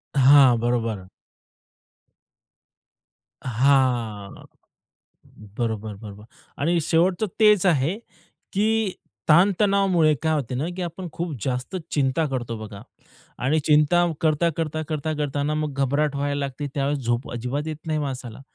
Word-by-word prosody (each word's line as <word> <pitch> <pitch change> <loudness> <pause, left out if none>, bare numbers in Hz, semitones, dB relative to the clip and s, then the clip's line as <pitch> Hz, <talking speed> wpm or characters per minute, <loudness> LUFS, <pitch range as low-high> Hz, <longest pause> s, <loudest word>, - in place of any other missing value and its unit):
हां, 135 -2 +6
बरोबर. 115 -5 -1 2.4
हां. 120 -5 0 1.1
बरोबर, 110 -3 -3
बरोबर. 105 0 -11 0.3
आणि 170 +4 +1
शेवटचं 175 +6 +1
तेच 210 -3 +5
आहे, 165 +1 +2 0.6
की 215 0 +1 0.4
ताण-तणावामुळे 190 -1 +4
काय 160 0 +1
होते 130 -5 -2
ना, 140 - -1
की 185 - -5
आपण 175 +1 -5
खूप 170 -2 -4
जास्त 125 +7 -3 0.2
चिंता 140 +2 +1
करतो 120 -4 -4
बघा. 110 -2 -9 0.6
आणि 145 +5 +1
चिंता 155 +3 +4 0.2
करता, 160 +1 +2
करता, 155 -1 -2
करता 155 0 -2
करता 145 -1 -2
ना 150 +1 -1
मग 150 -2 -2
घबराट 145 +2 0
व्हायला 145 0 -1
लागते, 140 +1 -4
त्यावेळेस 140 0 0
झोप 120 +2 -1
अजिबात 125 +6 -3
येत 155 -1 -4
नाही 155 -1 0
माणसाला. 130 -5 -5
145 Hz, 125 wpm, -23 LUFS, 125-165 Hz, 2.4 s, हां